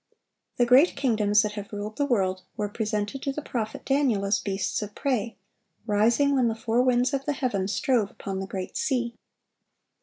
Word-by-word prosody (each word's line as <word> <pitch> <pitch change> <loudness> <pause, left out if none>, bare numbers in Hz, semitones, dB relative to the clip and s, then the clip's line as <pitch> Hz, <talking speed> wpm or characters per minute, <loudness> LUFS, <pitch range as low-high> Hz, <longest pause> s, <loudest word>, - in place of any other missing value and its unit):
The 245 - +4
great 260 +8 +5
kingdoms 215 -6 +3
that 210 - -2
have 205 -1 -7
ruled 210 +1 -5
the 285 - +1
world 190 -7 +1 0.2
were 210 -2 -1
presented 210 +3 -3
to 275 - -1
the 300 +2 -5
prophet 220 -6 -4
Daniel 270 -8 +2
as 200 +1 +2
beasts 195 0 -2
of 210 0 -7
prey, 235 -6 -1 0.5
rising 230 +7 +3
when 255 -3 +3
the 225 - 0
"four 225 +1 +1
winds 250 +1 +2
of 275 0 -1
the 295 - 0
heaven 210 -9 -1
strove 235 -2 +1
upon 195 -1 -5
the 195 - -4
great 190 -1 -5
sea." 240 -4 0
225 Hz, 185 wpm, -26 LUFS, 205-260 Hz, 0.5 s, great